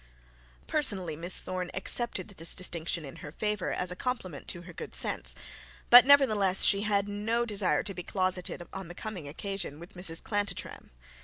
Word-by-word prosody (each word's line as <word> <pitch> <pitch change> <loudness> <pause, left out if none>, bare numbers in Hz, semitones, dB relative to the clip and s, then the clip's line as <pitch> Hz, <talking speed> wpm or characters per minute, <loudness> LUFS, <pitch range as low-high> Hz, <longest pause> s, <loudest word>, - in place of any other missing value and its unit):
Personally 200 - 0
Miss 170 +4 +1
Thorne 185 -1 -4
accepted 190 0 -1
this 170 -4 +1
distinction 170 -2 -2
in 135 - -10
her 150 - -8
favour 210 +2 -2
as 180 0 +1
a - - -5
compliment 185 - -4
to 175 -1 -4
her 175 0 -11
good - - -5
sense; - - 0 0.6
but 245 +2 +11
nevertheless 215 -10 +5
she 200 0 +4
had 205 -1 +1
no 220 +4 0
desire 200 -9 +3
to 195 - -5
be 180 - -6
closeted 185 -1 -2
on 190 -2 -6
the 175 - -10
coming 190 -9 -6
occasion 175 0 -4
with 170 +2 -12
Mrs 175 -2 -2
Chantantrum. 205 -4 -3
190 Hz, 170 wpm, -29 LUFS, 175-210 Hz, 0.6 s, but